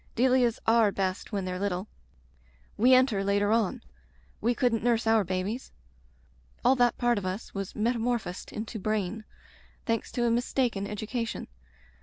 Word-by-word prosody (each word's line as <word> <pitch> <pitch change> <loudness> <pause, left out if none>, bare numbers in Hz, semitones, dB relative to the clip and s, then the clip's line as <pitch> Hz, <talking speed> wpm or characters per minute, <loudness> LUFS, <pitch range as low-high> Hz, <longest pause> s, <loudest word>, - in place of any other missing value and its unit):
Delias 250 -1 +3
are 225 -2 +4
best 190 +1 -2
when 200 -3 -2
they're 180 0 -3
little. 195 0 -2 0.9
We 250 +4 +6
enter 255 -6 +3
later 200 +1 +2
on. 225 -4 +1 0.6
We 235 +3 +1
couldn't 235 -4 +1
nurse 235 -1 +2
our 225 -1 +4
babies. 190 +7 -3 0.9
All 255 +2 +6
that 245 -1 +3
part 240 -3 +2
of 195 - -7
us 190 +5 -5
was 195 -1 -5
metamorphosed 230 -4 -1
into 220 +1 -5
brain 215 +1 -2 0.3
— - - -29
thanks 230 -1 -1
to 240 - 0
a 235 - +2
mistaken 240 -3 0
education. 220 +3 -4
220 Hz, 150 wpm, -28 LUFS, 200-240 Hz, 0.9 s, We